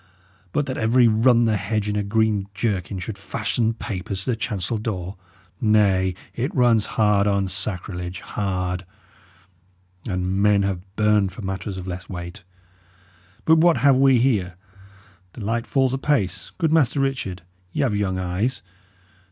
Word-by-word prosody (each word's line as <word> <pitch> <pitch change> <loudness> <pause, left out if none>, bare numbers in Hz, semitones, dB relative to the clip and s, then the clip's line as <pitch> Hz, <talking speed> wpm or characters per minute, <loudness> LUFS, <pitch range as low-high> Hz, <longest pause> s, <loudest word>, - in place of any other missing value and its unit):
But 145 - 0
that 130 -2 -4
every 120 +2 +4
run 115 +2 +4
the 110 -2 +2
hedge 105 +1 -2
in 105 - -1
a 105 - +1
green 105 -1 +1
jerkin 95 -2 -2
should 100 +3 -6
fasten 110 +4 -1
papers 100 -3 -3
to 125 - 0
the - - 0
chancel 110 -1 -2
door 95 -4 -4 0.5
nay, 100 -5 +3 0.2
it 130 +5 -3
runs 120 -5 +3
hard 105 -2 +3
on 100 -1 +1
sacrilege, 90 -1 -3
hard; 90 -2 -2 1.2
and 90 0 -1
men 100 -1 +4
have 95 -2 -1
burned 105 -2 +3
for 105 - -9
matters 95 0 -4
of 90 - -6
less 90 -1 -6
weight. 90 +2 -7 1.0
But 160 0 +6
what 170 0 +5
have 140 -2 +5
we 135 -1 +5
here? 105 -8 +1 0.8
The 110 - -7
light 115 +2 -1
falls 130 -2 +2
apace. 135 - -1
Good 160 -3 +1
Master 145 -3 +3
Richard, 125 -10 -2 0.3
y' - - -1
have 120 -6 +1
young 95 -2 -1
eyes. 95 +8 -2
105 Hz, 150 wpm, -23 LUFS, 95-120 Hz, 1.2 s, But